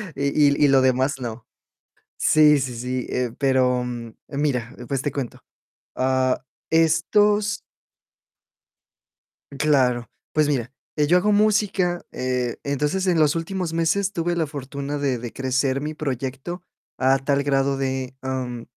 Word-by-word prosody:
y 140 +1 +2
y - - +7
lo 135 -1 +5
demás 130 +2 +2
no. 115 -2 -6 0.7
Sí, 150 -1 +5
sí, 130 -2 -3
sí, 125 +1 -3
eh, 125 -2 -1
pero, 130 -2 +2
mm, 120 -2 -6 0.2
mira, 140 -5 -1
pues, 135 -1 -1
te 145 - -1
cuento. 130 -3 -5 0.5
Ah, 130 0 +1 0.3
estos. 205 +6 +3 1.9
Claro, 130 -4 +1 0.2
pues 155 -1 +2
mira, 130 -3 -1 0.2
eh, 150 -1 +2
yo 175 - +4
hago 205 +4 +2
música, 205 -4 +2
eh, 125 -2 -2
entonces 150 +7 0
en 175 -2 +3
los 155 -2 +4
últimos 175 +1 -3
meses 165 +5 +1
tuve 175 0 -1
la 165 -2 +1
fortuna 140 0 -5
de 135 -4 -1
de 120 -1 -6
crecer 130 +1 0
mi 150 +2 -4
proyecto 135 +5 -4 0.3
a 130 +1 +3
tal 140 +1 0
grado 135 -1 +1
de, 130 -1 -2
mm, 130 -3 -4
140 Hz, 135 wpm, -23 LUFS, 130-160 Hz, 1.9 s, y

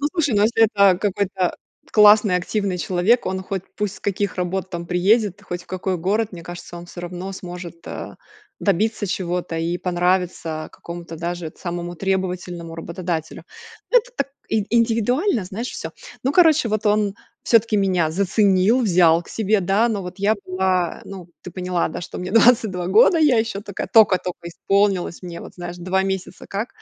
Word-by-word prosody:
Ну 290 - +1
слушай, 300 - +1
ну 205 - +3
если 225 +1 +4
это 200 -4 +4
какой-то 195 -3 -1 0.4
классный 210 -3 +6
активный 195 0 -2
человек, 185 +8 +2
он 190 0 -2
хоть 190 -1 -4
пусть 210 -1 -2
с - - -15
каких 200 -1 -2
работ 185 +1 -2
там 170 -1 -5
приедет, 200 +3 +2
хоть 175 -3 -6
в - - -24
какой 185 0 -2
город, 205 +5 0
мне 170 -1 -9 0.3
он 175 0 -8
всё 175 - -9
равно 180 +2 -6
сможет, 175 -2 -9
а, - - -7 0.4
добиться 205 +2 +1
чего-то 175 -2 -3
и 170 +2 -1
понравиться 175 -3 -1
какому 170 0 -8
то 165 - -8
даже 170 -1 -4
самому 175 -1 -5
требовательному 180 -2 -3
работодателю. 165 -1 -4 0.5
Ну - - +7
это - - -7
так 275 - -1 0.2
и 215 -2 +1
индивидуально, 230 - +1
знаешь 220 +7 -5
всё. - - -6 0.3
Ну 270 - +1
короче, 320 -8 +5
вот 215 0 -1
он 210 -1 +2 0.3
всё 230 - +6
таки 220 -1 -2
меня 180 -5 +1
заценил, 200 +4 +3
взял 170 -4 +4
к - - -18
себе, 215 -1 +1
да 195 +6 +2
ну 210 -4 -2
вот 180 0 -7
я 205 +2 +2
была, 185 -1 0
ну 185 -3 -9
ты 180 - -8
поняла, 180 -1 -1
да, - - -6
что 170 - -7
мне 180 +1 -5
22 220 -6 +4
года, 225 - +5
я 290 -7 +4
еще 220 -3 -3
такая 200 -2 -6
тока 210 -5 +6
тока 175 -1 -6
исполнилась 195 0 0
мне 175 -1 -7
вот - - -11
знаешь 175 -1 -7
2 185 +2 0
месяца 190 -1 -4
как. 210 +5 -3
190 Hz, 180 wpm, -21 LUFS, 175-210 Hz, 0.5 s, Ну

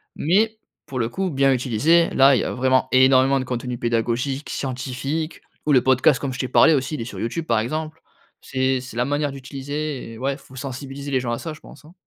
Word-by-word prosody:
mais, 215 +7 +2 0.3
pour 130 -2 -5
le 115 - 0
coup, 190 +7 -2
bien 135 -3 +3
utilisé, 130 +7 +3
là, 135 +1 +6
il - - +2
y - - -2
a - - -2
vraiment 130 0 +2
énormément 130 +1 +5
de 130 - -3
contenu 125 -1 -4
pédagogique, 120 +4 -1
scientifique 135 +4 -4 0.2
ou 150 - +3
le 130 - +6
podcast 130 +1 +4
comme 140 - -3
je 125 - -7
t'ai 130 - -1
parlé 160 +6 +5
aussi, 135 +1 -1
il 130 - -5
est - - -4
sur - - -8
YouTube, 140 +9 -3
par 115 -7 +2
exemple. 155 +7 -4 0.5
C'est 130 -1 0
c'est 125 -2 -10
la 125 - +1
manière 145 +1 -1
d'utiliser 140 0 -5
et - - -10
ouais, 135 +3 -1
faut 130 - -17
sensibiliser 135 +1 -6
les 130 -2 +1
gens 120 -1 -3
à 120 - -2
ça, 160 - -5
je 155 - -14
pense, - - -15
hein. 160 - -16
135 Hz, 230 wpm, -22 LUFS, 125-145 Hz, 0.5 s, là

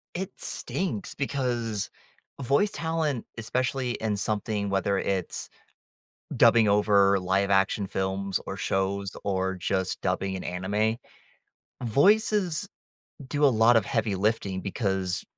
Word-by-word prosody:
It 185 +2 -3
stinks 150 - -3
because 120 -6 -2 0.5
voice 140 - +2
talent, 160 - -2
especially 125 +2 -1
in 110 -2 -2
something, 105 0 -1
whether 100 0 +1
it's 95 -2 -2 0.9
dubbing 115 -3 +6
over 100 -1 +4
live 95 +2 +1
action 95 +1 +2
films 95 0 -2
or 95 - -4
shows 100 0 -1
or 95 -1 0
just 95 +1 -2
dubbing 95 +1 -1
an 95 - -6
anime, 100 +5 0 0.9
voices 200 - +3 0.6
do 145 +1 +1
a - - +9
lot 115 -2 +5
of 110 - +3
heavy 110 -2 -1
lifting 100 -2 0
because, 95 -2 -1
105 Hz, 115 wpm, -27 LUFS, 95-125 Hz, 0.9 s, a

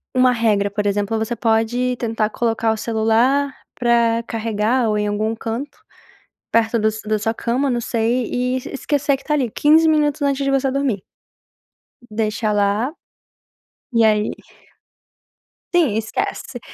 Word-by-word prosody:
uma 255 0 +5
regra, 215 -4 +1
por 205 0 -1
exemplo, 205 +2 0
você 220 +2 -2
pode 230 +3 +1
tentar 225 -2 -1
colocar 225 -1 0
o - - -5
celular 230 +6 +1 0.2
pra 235 -1 +2
carregar 225 +2 0
ou 210 - +1
em 210 - 0
algum 215 +2 -1
canto, 235 +6 -5 0.7
perto 230 0 +2
do 215 0 +2 0.2
da 215 0 +1
sua 225 +2 -1
cama 250 +5 -1
não 240 -1 0
sei 235 +2 0
e 250 +1 0 0.2
esquecer 285 0 0
que 270 - -17
está 300 - -1
ali, 260 -6 0
15 310 +7 +4
minutos 300 -1 +2
antes 280 -1 +1
de 275 - +1
você 270 0 +1
dormir. 260 -8 -1 1.1
Deixa 215 0 -1
lá 205 +6 +1 1.0
e 230 -1 +4
aí 215 -1 +2 1.4
Sim, 295 -12 +3
esquece. 235 +3 -3
230 Hz, 145 wpm, -20 LUFS, 220-260 Hz, 1.4 s, uma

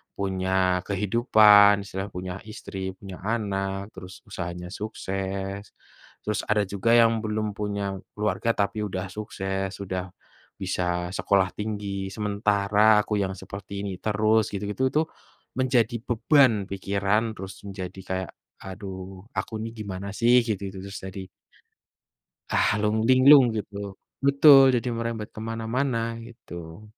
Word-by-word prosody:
punya 95 -1 0
kehidupan 105 0 +5
istilahnya 100 0 -5
punya 90 0 -5
istri 95 -3 -6
punya 95 -3 -9
anak 100 -3 -2
terus 95 0 -10
usahanya 90 0 -5
sukses, 95 -1 -5 0.5
terus 105 0 -1
ada 105 -1 +3
juga 100 +4 0
yang 115 -1 +5
belum 105 -1 -2
punya 100 -2 -3 0.2
keluarga 105 +2 0
tapi 105 +1 -1
sudah 95 -2 -4
sukses, 95 -1 -4
sudah 95 -2 -4 0.5
bisa 90 -1 -1
sekolah 95 -3 +2
tinggi 100 -2 -3
sementara 105 +1 +3
aku 105 0 -1
yang 95 -1 -1
seperti 100 +1 -7
ini 95 -2 -4
terus 110 +1 +2
gitu-gitu 105 +6 -1
itu 155 - +3 0.5
menjadi 125 -3 +2
beban 120 -2 +4
pikiran 100 +3 0
terus 95 +1 -9
menjadi 95 -1 -7
kayak, 95 -1 -3 0.3
"Aduh 95 -1 -8
aku 95 +4 -3
nih 115 0 -6
gimana 100 0 -5
sih 120 +2 +5
gitu-gitu 100 -2 -3
terus." 100 - -7
jadi 95 0 -7 1.2
ah, - - +3
lung 105 +1 +1
linglung 130 +2 +8
gitu, 100 -2 -5 0.3
betul, 140 0 +8
jadi 120 +1 -1
merembet 115 -2 -3
kemana-mana 115 +1 -2
gitu. 85 -5 -10
100 Hz, 120 wpm, -25 LUFS, 95-110 Hz, 1.2 s, linglung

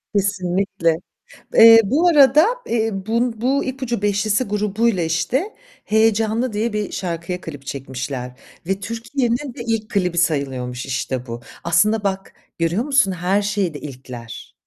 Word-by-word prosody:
Kesinlikle. 185 -4 0 0.6
Eee, 225 0 +9
bu 295 - +2
arada, 300 -1 +6 0.2
eee, 225 -1 +1
bu 225 +3 -1
bu 270 +3 +1
İpucu 260 -4 -3
Beşlisi 205 +3 +1
grubuyla, 210 -2 0
işte, 245 - -1 0.3
"Heyecanlı" 220 +2 +1
diye 215 +1 -1
bir 210 -1 -2
şarkıya 175 0 -4
klip 145 -4 -9
çekmişler 130 -1 -5 0.4
ve 195 0 -1
Türkiye'nin 240 +4 -2
de 240 - -8
ilk 220 -1 -1
klibi 180 -4 0
sayılıyormuş 130 -7 -1
işte 125 0 -3
bu. 115 +1 -6 0.2
Aslında 205 +6 +2
bak, 195 -1 -3 0.3
görüyor 170 +8 +1
musun? 275 -9 +3
Her 185 +3 0
şeyde 195 -7 -1
ilkler... 125 -4 -9
200 Hz, 130 wpm, -20 LUFS, 165-230 Hz, 0.6 s, Eee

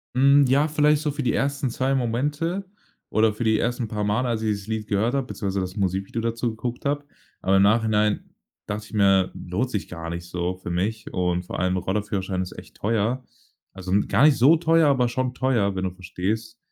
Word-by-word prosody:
Hm, 140 +2 +6
ja, 140 +4 +4
vielleicht 150 -1 +2
so 150 -2 -1
für 145 - -3
die 125 - +1
ersten 140 -1 0
2 130 +3 0
Momente 145 - -1 0.5
oder 110 0 +3
für 110 +3 -4
die 110 -1 +3
1. 120 0 -1
paar 105 0 -3
Male, 110 +5 0
als 115 -2 -1
ich 110 - 0
dieses 100 -2 -2
Lied 110 -1 -3
gehört 110 +5 +1
habe, 135 -2 0
beziehungsweise 100 -2 -2
das 90 0 -4
Musikvideo 95 +3 -1
dazu 115 +1 -1
geguckt 120 +2 -5
habe. 145 0 -1 0.4
Aber 95 +1 +2
im 95 - +5
Nachhinein 105 0 +2 0.4
dachte 105 +1 -4
ich - - -17
mir, 95 -3 +3
lohnt 100 +9 -3
sich 105 -5 -3
gar 85 -1 -6
nicht 85 0 -6
so 90 +1 -2
für 90 - -7
mich 100 +6 -2
und 90 -1 0
vor - - -5
allem 90 0 +1
Roller-Führerschein 95 0 -2
ist 90 - -8
echt - - -12
teuer. 115 +4 0 0.5
Also 95 -1 -6
'n 100 +1 +2
gar 140 - +4
nicht 150 -2 +6
so 145 +7 +6
teuer, 165 -1 +3
aber 130 -3 +3
schon 130 +1 -1
teuer, 115 -7 +1
wenn 95 - -2
du 95 - -1
verstehst. 100 +5 -4
110 Hz, 210 wpm, -24 LUFS, 95-130 Hz, 0.5 s, Hm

